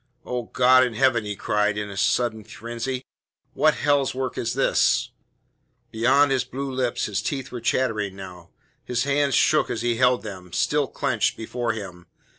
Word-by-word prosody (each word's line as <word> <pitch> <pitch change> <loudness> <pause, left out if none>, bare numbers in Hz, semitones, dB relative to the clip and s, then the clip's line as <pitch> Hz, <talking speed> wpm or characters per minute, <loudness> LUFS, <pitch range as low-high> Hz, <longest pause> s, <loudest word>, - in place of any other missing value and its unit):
"Oh, 125 -1 -3
God 130 0 +5
in 125 -3 -2
heaven!" 125 -3 +2
he 105 0 -4
cried 105 +1 0
in 105 -1 -4
a - - -8
sudden 120 0 0
frenzy. 120 +4 -5 0.5
"What 155 +1 +3
hell's 145 -3 +1
work 130 -1 -3
is 115 - -2
this?" - - +2 0.8
Behind 135 +5 +3
his 130 -2 +2
blue 135 +1 -5
lips 130 -2 -1
his 105 - -2
teeth 135 -3 -4
were 120 -2 -6
chattering 110 -5 0
now. 90 -3 -10 0.3
His 125 -1 -1
hands 140 -1 +1
shook - - +3
as 115 - -3
he 120 -1 0
held 125 0 +3
them, 95 -4 -9
still - - +1
clenched, - - -1
before 120 +1 -3
him. 90 -5 -8
120 Hz, 170 wpm, -24 LUFS, 105-130 Hz, 0.8 s, God